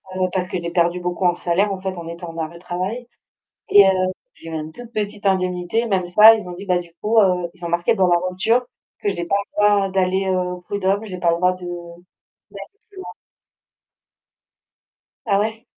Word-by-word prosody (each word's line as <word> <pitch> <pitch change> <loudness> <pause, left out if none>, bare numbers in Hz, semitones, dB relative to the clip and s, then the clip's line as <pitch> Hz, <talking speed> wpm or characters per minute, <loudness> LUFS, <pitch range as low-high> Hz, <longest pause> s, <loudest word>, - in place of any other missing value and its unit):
heu, - - -4
parce 185 -1 -2
que - - -2
j'ai 170 - -4
perdu 175 +1 +1
beaucoup 180 +1 -2
en 175 0 +3
salaire 190 +5 0
en 190 - -4
fait, 190 0 -4
en 170 -1 -8
étant 170 0 -7
en 165 - -12
arrêt 160 +1 -4
de - - -11
travail. 190 +8 -4 0.6
Et 200 -1 +8
heu, - - +5 0.4
j'ai 165 - -12
eu - - -7
une 155 0 -5
toute 240 +2 -12
petite 210 -1 -4
indemnité, 185 +4 0
même 190 -4 0
ça, 215 +5 +8
ils 215 -4 -5
ont - - -6
dit: 190 +3 -9
«Bah 180 -1 +2
du 170 -1 -9
coup, 220 +2 +2
heu», 180 -3 +2
ils 175 -1 -12
ont - - -3
marqué 175 +6 +1
dans 190 -3 +3
la 175 -1 +3
rupture 225 +7 +1 0.4
que 205 - 0
j'ai 175 -3 -2
pas 200 - 0
le - - -67
droit 205 -1 +4
d'aller, 190 0 0
heu, 185 -1 +1
aux 180 0 -3
prud'hommes, 200 +3 -1
j'ai 185 -4 -7
pas 170 -1 +2
le 170 - +1
droit 180 +1 +2
de 180 -1 -11
d'aller 175 +1 -10 0.7
plus 400 - -19
loin. 375 - -7 2.2
Ah 200 -2 +2
ouais? 220 +2 -2
185 Hz, 220 wpm, -21 LUFS, 175-205 Hz, 2.2 s, Et